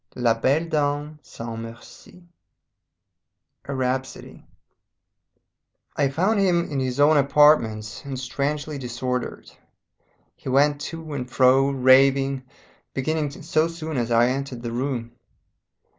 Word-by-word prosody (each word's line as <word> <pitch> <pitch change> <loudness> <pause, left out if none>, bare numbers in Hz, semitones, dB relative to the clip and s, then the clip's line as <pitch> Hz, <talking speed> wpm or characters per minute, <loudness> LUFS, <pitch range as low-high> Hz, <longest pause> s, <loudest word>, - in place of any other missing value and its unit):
LA 120 -2 +2
BELLE 135 +8 +1
DAME 150 0 -1
SANS 115 -4 -8
MERCI 115 +9 -12 1.4
A 140 - -4
RHAPSODY 130 0 -4 1.5
I 140 - +1
found 190 +10 +1
him 175 -3 +2
in 140 - -1
his 130 0 -2
own 150 +2 +5
apartments, 135 -7 +3
and 135 -2 -5
strangely 145 +3 -3
disordered. 125 0 -4 0.8
He - - -8
went 145 +2 +3
to 160 0 -7
and 125 -3 -5
fro, 130 +1 +4
raving 135 0 +4 0.5
beginning 150 +2 -1
so 155 0 0
soon 160 -2 -6
as 120 -2 -1
I 120 +1 +4
entered 130 -2 -4
the 120 - -4
room. 120 -1 -3
135 Hz, 115 wpm, -23 LUFS, 125-150 Hz, 1.5 s, own